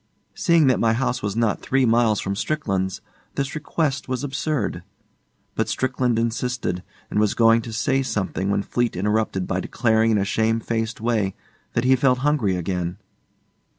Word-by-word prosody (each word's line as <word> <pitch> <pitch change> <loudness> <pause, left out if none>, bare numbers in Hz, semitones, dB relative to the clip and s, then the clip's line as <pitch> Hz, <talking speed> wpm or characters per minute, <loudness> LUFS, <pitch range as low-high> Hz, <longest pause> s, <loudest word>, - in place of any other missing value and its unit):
Seeing 170 -4 +3
that 130 -2 +3
my 115 -1 +3
house 125 +1 -1
was 100 0 -2
not 115 -3 +1
three 135 0 +2
miles 115 -2 +3
from 100 0 -2
Strickland's, 100 -8 -2 0.3
this 140 0 -2
request 150 -3 -2
was 130 +1 -2
absurd. 140 - -2 0.7
But - - -1
Strickland 125 -2 0
insisted, 115 -4 -1 0.3
and - - +1
was 105 -1 +2
going 115 0 +5
to 115 - -8
say 130 +4 +1
something 105 -6 -2
when 100 0 +1
Fleete 120 +1 -1
interrupted 105 -1 0
by 95 0 -1
declaring 110 +2 +2
in 110 - +3
a 100 - +1
shamefaced 115 +2 -1
way 110 -5 0 0.4
that 120 - +1
he 130 +1 +5
felt 130 0 +3
hungry 130 -11 +2
again. 90 0 -2
115 Hz, 160 wpm, -23 LUFS, 105-130 Hz, 0.7 s, going